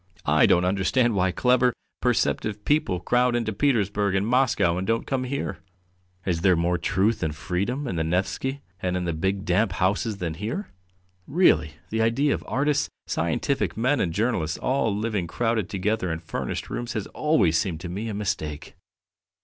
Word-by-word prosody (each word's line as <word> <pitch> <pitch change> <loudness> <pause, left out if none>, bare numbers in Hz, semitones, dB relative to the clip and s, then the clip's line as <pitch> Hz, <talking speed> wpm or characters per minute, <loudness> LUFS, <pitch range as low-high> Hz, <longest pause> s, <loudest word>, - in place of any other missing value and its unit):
I - - +5
don't 90 - +4
understand 100 +6 +2
why 95 -2 +2
clever, 125 +3 +3 0.3
perceptive 105 -1 0
people 145 - +1
crowd 125 +5 +2
into 115 -2 -1
Petersburg 105 -6 +1
and 95 +1 +1
Moscow 120 -8 +2
and 95 - -4
don't 115 0 0
come 130 -2 -1
here. 140 +2 -3 0.7
Is 85 -3 0
there 90 -1 +5
more 85 +1 +1
truth 100 +6 +1
and 80 -3 -1
freedom 100 - -2
in 90 - -3
the 80 - +1
Nevsky 95 - -1 0.2
and 90 0 0
in 90 - -2
the 85 - -1
big 95 +4 -1
damp 95 +2 +2
houses 100 +4 0
than 85 -4 -3
here? 110 - -4 0.6
Really, 140 - +3 0.2
the 110 +1 0
idea 125 +6 +2
of - - -4
artists, 145 +2 +1 0.2
scientific 85 - -1
men, 130 +5 +2
and 85 - 0
journalists 90 -6 0
all 130 -3 +1
living 105 -3 -1
crowded 115 -2 -1
together 95 -1 -1
in 80 - -2
furnished - - -5
rooms 120 +1 -3
has 110 -4 -2
always 150 - +2
seemed 80 -1 0
to 90 - -5
me 105 +6 -4
a 105 - -4
mistake." 90 -8 -3
105 Hz, 175 wpm, -25 LUFS, 90-125 Hz, 0.7 s, I